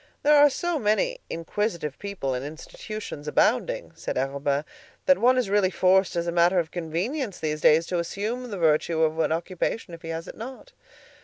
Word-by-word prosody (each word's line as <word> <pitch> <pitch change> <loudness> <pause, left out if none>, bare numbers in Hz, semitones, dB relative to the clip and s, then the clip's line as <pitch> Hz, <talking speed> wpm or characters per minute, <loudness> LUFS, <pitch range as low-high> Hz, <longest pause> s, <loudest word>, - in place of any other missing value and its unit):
"There 295 +1 +5
are 290 0 +7
so 345 +3 -2
many 280 - +1
inquisitive 170 -3 -3
people 200 -10 -3
and 125 +1 -3
institutions 155 +2 -7
abounding," - - +1
said - - -5
Arobin, 140 +2 -1 0.4
"that 275 - +5
one 255 +2 +4
is 255 - +1
really 200 -1 +3
forced 190 0 +3
as 170 0 0
a 170 - -1
matter 175 +2 +3
of 165 -3 0
convenience 185 - -3
these 155 -1 -2
days 160 +2 +5
to 175 0 -1
assume 220 +8 -3
the 205 - -5
virtue 160 0 +2
of 160 0 +1
an 160 - +2
occupation 175 +3 -2
if 165 - -9
he 165 - -8
has 165 +2 -4
it - - -8
not." 260 - -9
180 Hz, 185 wpm, -25 LUFS, 160-225 Hz, 0.4 s, are